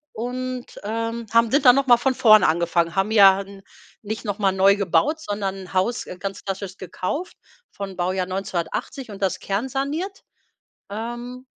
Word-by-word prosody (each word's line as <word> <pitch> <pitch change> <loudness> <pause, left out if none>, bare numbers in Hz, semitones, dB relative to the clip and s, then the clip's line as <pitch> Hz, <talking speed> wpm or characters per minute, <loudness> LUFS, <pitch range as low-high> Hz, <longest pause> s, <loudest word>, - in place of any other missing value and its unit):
und, 250 +2 -5
ähm, 230 +2 -3
haben 230 -1 +5
sind 285 +1 +2
dann 250 -1 +9
noch 275 -1 +1
mal 240 -1 +7
von 260 +2 +1
vorne 215 -3 +6
angefangen. 170 +1 +1
Haben 195 +2 +1
ja 195 -2 +7
n 195 0 -12 0.4
nicht 220 +2 -5
noch 205 -1 -2
mal 195 -2 +3
neu 190 +1 +4
gebaut, 210 - +1
sondern 195 -5 -4
Haus, 210 +6 0
äh, 180 - -9
ganz 195 0 -5
klassisch 195 -1 -5
gekauft 185 - -4 0.4
von 195 -2 -7
Baujahr 185 +1 -1
1980 190 - -4
und 200 0 -10
das 190 - 0
kernsaniert. 275 - -3 0.7
Ähm, 240 +4 -6
205 Hz, 160 wpm, -23 LUFS, 190-245 Hz, 0.7 s, dann